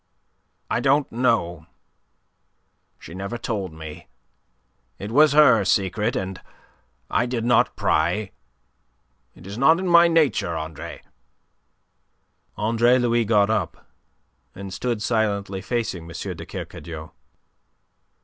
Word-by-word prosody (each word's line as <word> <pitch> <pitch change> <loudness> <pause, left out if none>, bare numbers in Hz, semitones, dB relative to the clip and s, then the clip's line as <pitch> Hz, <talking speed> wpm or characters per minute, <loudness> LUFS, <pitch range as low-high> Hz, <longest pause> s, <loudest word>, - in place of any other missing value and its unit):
"I - - 0
don't 140 +1 +2
know. 100 -10 0 1.3
She - - -12
never 100 +5 -5
told 100 -6 -4
me. 80 -1 -10 0.9
It 100 +2 -7
was 150 +3 +5
her 125 -8 +6
secret, 105 +5 0
and 95 -4 -4 0.7
I 120 - +1
did 120 -2 -3
not 120 -1 +3
pry. 90 +6 0 1.0
It 85 - -15
is 100 +4 -7
not 160 +5 +5
in 185 +1 -3
my 170 0 +7
nature, 155 - +1
Andre." 80 -1 -7 1.5
Andre 115 +3 +3
Louis 120 -2 +1
got 105 -1 +3
up, 90 -7 -3 0.6
and 95 0 -8
stood 115 +2 -2
silently 100 -4 -1
facing 110 -7 -3
M. 85 - -6
de - - -9
Kercadiou. 80 -2 -8
110 Hz, 110 wpm, -23 LUFS, 95-120 Hz, 1.5 s, my